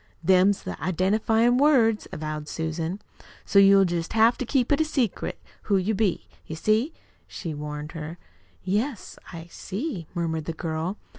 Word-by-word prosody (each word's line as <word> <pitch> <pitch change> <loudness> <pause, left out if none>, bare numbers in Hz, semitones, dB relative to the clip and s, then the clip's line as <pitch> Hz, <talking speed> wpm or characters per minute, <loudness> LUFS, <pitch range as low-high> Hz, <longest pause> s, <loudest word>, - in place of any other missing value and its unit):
"Them's 190 +3 +4
the - - -4
identifyin' 220 +7 +2
words," 245 -7 +3
avowed 155 -1 -5
Susan. 160 +4 -3 0.5
"So 200 - +4
you'll 195 0 +7
jest 170 -1 -2
have 225 +2 +5
to 255 - -3
keep 255 -1 +1
it 290 +2 +4
secret 255 -9 -2 0.3
who 200 - +4
you 190 +4 0
be, 200 -3 0 0.2
you 160 - -5
see," 215 - +1 0.4
she 165 -4 -6
warned 150 +1 -6
her. 165 +1 -7 0.5
"Yes, 210 +5 -2
I 165 -2 -8
see," 195 - -5
murmured 160 -2 -2
the 165 - -3
girl. 160 +4 -3
190 Hz, 150 wpm, -25 LUFS, 160-225 Hz, 0.5 s, you'll